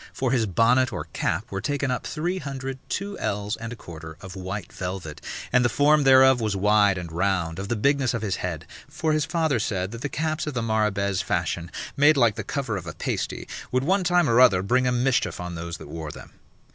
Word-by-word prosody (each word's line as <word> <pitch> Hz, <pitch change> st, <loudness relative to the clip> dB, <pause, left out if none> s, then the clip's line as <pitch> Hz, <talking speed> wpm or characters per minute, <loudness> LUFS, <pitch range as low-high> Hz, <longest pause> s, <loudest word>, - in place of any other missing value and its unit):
For 130 Hz, -2 st, -1 dB
his 120 Hz, -4 st, +2 dB
bonnet 120 Hz, +6 st, +3 dB
or -, -, -4 dB
cap -, -, -2 dB
were 95 Hz, 0 st, -3 dB
taken 140 Hz, +3 st, -1 dB
up 125 Hz, -, -3 dB
three 175 Hz, +4 st, -2 dB
hundred, 135 Hz, -2 st, -5 dB
two 200 Hz, +1 st, -3 dB
ells 105 Hz, 0 st, -2 dB
and 115 Hz, +1 st, -7 dB
a -, -, -5 dB
quarter 80 Hz, -5 st, -10 dB
of 95 Hz, -1 st, -9 dB
white 95 Hz, 0 st, -6 dB
velvet, 90 Hz, -5 st, -5 dB, 0.3 s
and 125 Hz, -, +5 dB
the 120 Hz, -, +3 dB
form 145 Hz, +4 st, +4 dB
thereof 130 Hz, -1 st, +7 dB
was 105 Hz, -3 st, 0 dB
wide 105 Hz, 0 st, +4 dB
and 85 Hz, -2 st, -6 dB
round, 85 Hz, -1 st, 0 dB
of 100 Hz, -, -4 dB
the 120 Hz, -, -1 dB
bigness 135 Hz, +2 st, +2 dB
of 115 Hz, -, -3 dB
his 100 Hz, -4 st, -1 dB
head; 85 Hz, -3 st, -4 dB, 0.2 s
for 155 Hz, +1 st, -1 dB
his 155 Hz, -1 st, +1 dB
father 160 Hz, -7 st, +1 dB
said 95 Hz, -2 st, -2 dB
that 115 Hz, 0 st, -8 dB
the 145 Hz, -, -2 dB
caps 155 Hz, +3 st, -2 dB
of 150 Hz, -, -4 dB
the 115 Hz, -, -1 dB
Marrabaise 105 Hz, -4 st, +1 dB
fashion, 85 Hz, 0 st, -2 dB, 0.3 s
made 145 Hz, +2 st, +5 dB
like 120 Hz, -5 st, +4 dB
the -, -, -5 dB
cover 130 Hz, -7 st, -2 dB
of 90 Hz, -3 st, -7 dB
a 85 Hz, -, -5 dB
pasty, -, -, -3 dB, 0.2 s
would 130 Hz, +1 st, +1 dB
one 190 Hz, +6 st, +2 dB
time 175 Hz, -2 st, +3 dB
or 115 Hz, 0 st, +4 dB
other 95 Hz, -7 st, +6 dB
bring 125 Hz, +5 st, +2 dB
a -, -, +2 dB
mischief 125 Hz, -2 st, +1 dB
on 90 Hz, 0 st, -5 dB
those 85 Hz, 0 st, -5 dB
that -, -, -11 dB
wore 80 Hz, 0 st, -6 dB
them. -, -, -11 dB
115 Hz, 225 wpm, -25 LUFS, 95-135 Hz, 0.3 s, thereof